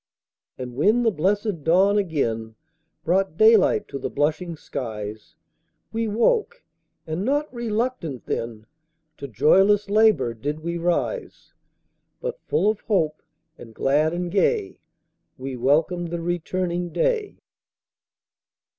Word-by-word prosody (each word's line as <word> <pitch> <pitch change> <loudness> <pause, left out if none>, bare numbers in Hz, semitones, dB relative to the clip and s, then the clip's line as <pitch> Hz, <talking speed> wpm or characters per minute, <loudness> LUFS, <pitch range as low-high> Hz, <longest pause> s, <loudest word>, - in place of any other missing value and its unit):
And 125 -1 -6
when 215 - +3
the 225 - +3
blessed 200 -1 -1
dawn 195 +6 +4
again 115 - -2 0.5
Brought 185 -1 +1
daylight 215 -1 +5
to 140 - -5
the - - -3
blushing 160 +4 -1
skies, 110 -7 -6 0.6
We 225 0 -1
woke, 450 - +1 0.4
and 160 +4 -3
not 290 +5 0
RELUCTANT 230 - -3
then, 115 -2 -4 0.5
To 140 - -5
joyless 195 - +3
LABOUR 215 - +4
did 145 +7 -4
we 170 +1 -3
rise; 175 - -2 0.7
But - - -5
full 205 - +2
of 215 -1 +1
hope, 160 -8 0 0.4
and 115 -2 -12
glad 150 +3 +2
and 175 0 -3
gay, 385 - +1 0.6
We 130 0 -5
welcomed 160 +7 +1
the 170 0 -3
returning 175 +1 -2
day. 465 - -1
175 Hz, 120 wpm, -23 LUFS, 145-215 Hz, 0.7 s, daylight